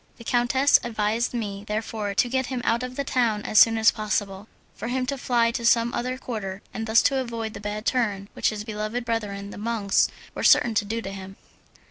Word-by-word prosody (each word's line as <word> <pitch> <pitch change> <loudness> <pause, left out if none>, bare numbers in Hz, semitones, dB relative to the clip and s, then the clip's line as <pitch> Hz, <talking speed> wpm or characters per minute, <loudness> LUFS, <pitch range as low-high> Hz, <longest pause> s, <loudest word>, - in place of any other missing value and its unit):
The 235 - -11
countess 250 +4 +3
advised 225 0 -1
me 205 -4 -4
therefore 210 -1 -3
to 245 - +3
get 260 +1 -1
him 250 -2 -4
out 235 +1 +2
of 255 0 -5
the 280 - -1
town 235 -6 0
as 215 - +3
soon 225 0 +6
as 220 +1 +5
possible, 205 -2 -3 0.3
for 225 - -6
him 255 +1 -1
to 280 +2 -2
fly 240 -3 +1
to 235 0 -4
some 235 0 +3
other 255 +1 -2
quarter, 210 -7 -6
and 225 +1 -4
thus 220 +1 +5
to 275 - +2
avoid 230 -3 -4
the 200 - -8
bad 210 +1 -5
turn 210 -7 0
which - - +1
his 210 -1 -5
beloved 215 +3 -4
brethren 205 -3 -3
the - - -9
monks 215 -2 +1 0.2
were - - -5
certain 240 - +5
to 210 -1 +1
do 225 +3 -3
him. 195 0 -8
225 Hz, 210 wpm, -25 LUFS, 210-240 Hz, 0.3 s, soon